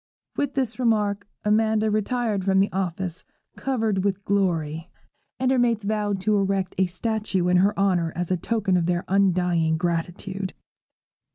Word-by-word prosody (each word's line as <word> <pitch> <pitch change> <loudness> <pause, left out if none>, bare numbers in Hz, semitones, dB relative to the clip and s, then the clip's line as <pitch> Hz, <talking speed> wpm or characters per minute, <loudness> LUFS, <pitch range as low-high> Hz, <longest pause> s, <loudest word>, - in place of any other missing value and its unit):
With 285 -1 -2
this 255 -4 -1
remark 210 -4 +1 0.2
Amanda 220 0 +2
retired 215 -1 0
from 195 +1 +3
office 185 -2 -3 0.3
covered 220 -7 -1
with 200 0 -1
glory, 165 -5 0 0.5
and 260 0 +2
her 260 - +3
mates 230 -4 +1
voted 205 -2 -1
to 210 +1 +2
erect 195 -1 0
a 190 - +4
statue 200 -1 -1
in 180 0 +4
her 200 +3 +3
honour 180 -4 +2
as 175 0 -3
a - - +3
token 195 0 0
of 170 -1 0
their 175 0 0
undying 180 -4 +2
gratitude. 175 +3 -3
195 Hz, 150 wpm, -24 LUFS, 180-215 Hz, 0.5 s, a